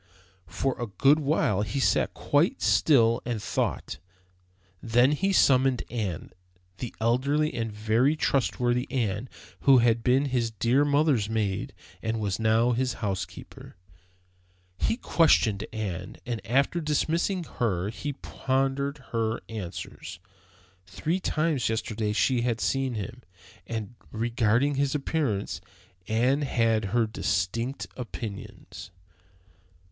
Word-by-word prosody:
For 125 Hz, +10 st, -1 dB
a 120 Hz, -, -2 dB
good 140 Hz, +9 st, +3 dB
while 135 Hz, -9 st, +1 dB
he 120 Hz, +6 st, -2 dB
sat -, -, +2 dB
quite -, -, +1 dB
still 115 Hz, -6 st, +4 dB
and 120 Hz, -2 st, -3 dB
thought. 105 Hz, -, -2 dB, 0.8 s
Then 120 Hz, +4 st, +3 dB
he 195 Hz, +7 st, +1 dB
summoned 130 Hz, -7 st, +4 dB
Ann, 100 Hz, -9 st, -3 dB, 0.5 s
the 125 Hz, -, -4 dB
elderly 140 Hz, +7 st, +1 dB
and 115 Hz, -2 st, -3 dB
very 110 Hz, +7 st, +2 dB
trustworthy 125 Hz, -3 st, 0 dB
Ann, 115 Hz, -2 st, -2 dB, 0.3 s
who 135 Hz, -1 st, +6 dB
had 115 Hz, -1 st, +3 dB
been 130 Hz, +3 st, +3 dB
his 125 Hz, -4 st, 0 dB
dear 120 Hz, +5 st, +2 dB
mother's 145 Hz, -7 st, +2 dB
maid, 105 Hz, -4 st, -1 dB, 0.3 s
and 110 Hz, 0 st, -2 dB
was 100 Hz, -2 st, -2 dB
now 110 Hz, +2 st, +3 dB
his 125 Hz, 0 st, 0 dB
housekeeper. 95 Hz, -2 st, -6 dB, 1.0 s
He 225 Hz, -, +1 dB
questioned 120 Hz, -, +3 dB
Ann, 95 Hz, -5 st, -5 dB
and 120 Hz, -3 st, -3 dB
after 140 Hz, +8 st, +2 dB
dismissing 165 Hz, +5 st, 0 dB, 0.2 s
her 100 Hz, -5 st, 0 dB
he 145 Hz, +6 st, -4 dB
pondered 135 Hz, +1 st, -2 dB
her 115 Hz, 0 st, -1 dB
answers. 95 Hz, -4 st, -7 dB, 0.7 s
Three 155 Hz, -, -2 dB
times 155 Hz, -8 st, 0 dB
yesterday 110 Hz, -1 st, -2 dB
she 120 Hz, +3 st, +2 dB
had 120 Hz, -2 st, 0 dB
seen 135 Hz, -1 st, 0 dB
him, 120 Hz, +4 st, -6 dB, 0.5 s
and 115 Hz, -1 st, -4 dB, 0.2 s
regarding 115 Hz, +4 st, +1 dB
his 140 Hz, 0 st, 0 dB
appearance 135 Hz, -8 st, -1 dB, 0.5 s
Ann 125 Hz, +6 st, +2 dB
had 115 Hz, -5 st, +1 dB
her 115 Hz, +4 st, +1 dB
distinct 110 Hz, +4 st, -2 dB
opinions. 110 Hz, -8 st, -8 dB
120 Hz, 120 wpm, -27 LUFS, 110-135 Hz, 1.0 s, who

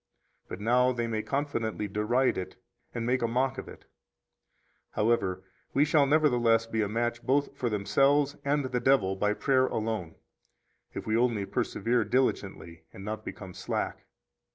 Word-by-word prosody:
But -, -, -7 dB
now 125 Hz, +4 st, +3 dB
they 120 Hz, -2 st, -2 dB
may 110 Hz, -2 st, -2 dB
confidently 115 Hz, -6 st, -2 dB
deride 105 Hz, +6 st, +1 dB
it 95 Hz, -, -5 dB, 0.4 s
and 115 Hz, -1 st, -4 dB
make 125 Hz, +1 st, +1 dB
a 115 Hz, -, +1 dB
mock 130 Hz, +3 st, 0 dB
of -, -, -8 dB
it; -, -, -13 dB, 1.1 s
however, 105 Hz, -4 st, 0 dB, 0.3 s
we 140 Hz, +2 st, +5 dB
shall 150 Hz, -2 st, +3 dB
nevertheless 120 Hz, -7 st, +3 dB
be 115 Hz, -1 st, -2 dB
a 105 Hz, -, -1 dB
match 120 Hz, +2 st, -1 dB
both 140 Hz, +3 st, 0 dB
for 125 Hz, -3 st, -1 dB
themselves 140 Hz, +8 st, +2 dB
and 145 Hz, 0 st, +1 dB
the 125 Hz, -1 st, -1 dB
devil 120 Hz, -7 st, +3 dB
by 105 Hz, +2 st, 0 dB
prayer 130 Hz, +1 st, +2 dB
alone, 110 Hz, -7 st, -3 dB, 0.8 s
if -, -, -5 dB
we 110 Hz, -, 0 dB
only 115 Hz, -4 st, +1 dB
persevere 120 Hz, +4 st, 0 dB
diligently 95 Hz, -8 st, -1 dB
and 95 Hz, -, -10 dB
not 110 Hz, 0 st, -4 dB
become 95 Hz, -4 st, -8 dB
slack. -, -, -4 dB
115 Hz, 155 wpm, -28 LUFS, 105-130 Hz, 1.1 s, we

